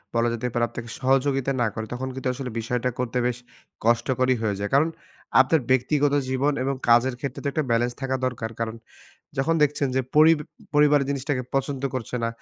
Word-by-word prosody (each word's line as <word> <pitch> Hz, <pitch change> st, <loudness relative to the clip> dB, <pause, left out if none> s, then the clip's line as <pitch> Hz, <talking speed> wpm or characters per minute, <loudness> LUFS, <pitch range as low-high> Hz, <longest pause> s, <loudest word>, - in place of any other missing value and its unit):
বলা 115 Hz, 0 st, +2 dB
যেতে 120 Hz, +2 st, -2 dB
পারে, 120 Hz, -, +1 dB
আপনাকে 115 Hz, -1 st, -7 dB
সহযোগিতা 135 Hz, 0 st, +2 dB
না 115 Hz, -, +3 dB
করে, 110 Hz, -1 st, -4 dB
তখন 130 Hz, +2 st, -4 dB
কিন্তু 130 Hz, 0 st, -4 dB
আসলে 130 Hz, -1 st, -5 dB
বিষয়টা 125 Hz, +2 st, -1 dB
করতে 125 Hz, 0 st, -2 dB
বেশ 125 Hz, -1 st, 0 dB, 0.5 s
কষ্টকরই 125 Hz, +2 st, +2 dB
হয়ে 105 Hz, -3 st, 0 dB
যায়। 105 Hz, -, -2 dB
কারণ, 155 Hz, +4 st, +4 dB, 0.5 s
আপনার 140 Hz, +2 st, +2 dB
ব্যক্তিগত 140 Hz, +3 st, +2 dB, 0.2 s
জীবন 140 Hz, +3 st, +1 dB
এবং 135 Hz, 0 st, 0 dB
কাজের 120 Hz, +2 st, +5 dB
ক্ষেত্রে 135 Hz, -3 st, -4 dB
তো -, -, -1 dB
একটা 155 Hz, -, 0 dB
ব্যালেন্স 120 Hz, +1 st, +1 dB
থাকা 130 Hz, 0 st, -1 dB
দরকার। 115 Hz, -3 st, -3 dB
কারণ, 115 Hz, 0 st, -2 dB, 0.6 s
যখন 165 Hz, +5 st, +2 dB
দেখছেন 145 Hz, -1 st, +2 dB
যে -, -, +4 dB, 0.2 s
পরিব 155 Hz, +1 st, +7 dB, 0.4 s
পরিবার 150 Hz, -1 st, +5 dB
জিনিসটাকে 140 Hz, -1 st, -1 dB
পছন্দ 135 Hz, 0 st, -1 dB
করছে 125 Hz, 0 st, -3 dB
না, -, -, +1 dB
130 Hz, 185 wpm, -24 LUFS, 120-140 Hz, 0.6 s, পরিব